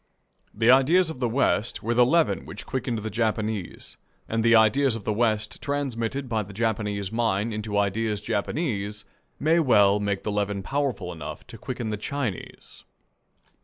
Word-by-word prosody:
The 115 +3 +4
ideas 160 +7 +4
of 130 - -9
the 120 -2 0
West 115 -2 0
were 115 +2 0
the 125 +1 +5
leaven 165 +3 +2
which 105 -1 -8
quickened 125 -3 -2
the 110 - -4
Japanese; 110 -3 -2 0.3
and 115 0 -1
the 115 0 +5
ideas 115 +3 +4
of 115 - -6
the 105 - -1
West, 110 -1 0
transmitted 135 -2 -2
by 115 -2 0
the 100 -1 -9
Japanese 105 -3 -1
mind 115 -1 0
into 105 -1 -3
ideas 105 +1 0
Japanese, 105 - -2 0.3
may 160 +3 +3
well 105 -9 +4
make 100 -1 -2
the 105 - -2
leaven 100 -1 -1
powerful 130 -8 -2
enough 75 -2 -8
to 125 - -11
quicken 120 -2 -4
the 105 - -2
Chinese. 115 -3 -5
110 Hz, 165 wpm, -25 LUFS, 105-125 Hz, 0.3 s, the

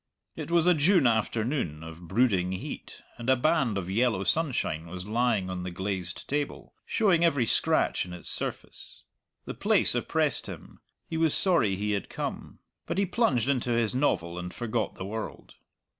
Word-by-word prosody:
It - - -6
was 170 -1 +4
a 180 - +6
June 165 0 +4
afternoon, 110 - 0
of 80 +1 -10
brooding 95 -4 +2
heat, 95 - -7 0.2
and 120 +2 -3
a 130 - +6
band 135 -5 +1
of 90 -3 -3
yellow 110 0 +1
sunshine 120 - 0
was 90 +2 -7
lying 110 -3 +1
on 90 -1 -4
the 90 - -4
glazed 95 -1 -2
table, 145 0 -3
showing 190 -6 +3
every 140 -8 +3
scratch - - +2
in 90 - -9
its 90 -1 -3
surface. - - -5 0.4
The - - -5
place - - +3
oppressed - - 0
him; - - -10 0.3
he 160 - -3
was 160 -2 +2
sorry 165 - +2
he 105 +2 -2
had 100 -1 -2
come. - - -5 0.3
But - - -2
he 200 - +3
plunged 155 - +1
into 125 -3 +1
his 115 -1 +1
novel 90 - 0
and 90 0 -6
forgot 115 0 -2
the 95 - -6
world. 110 +2 -6
115 Hz, 175 wpm, -28 LUFS, 95-145 Hz, 0.4 s, a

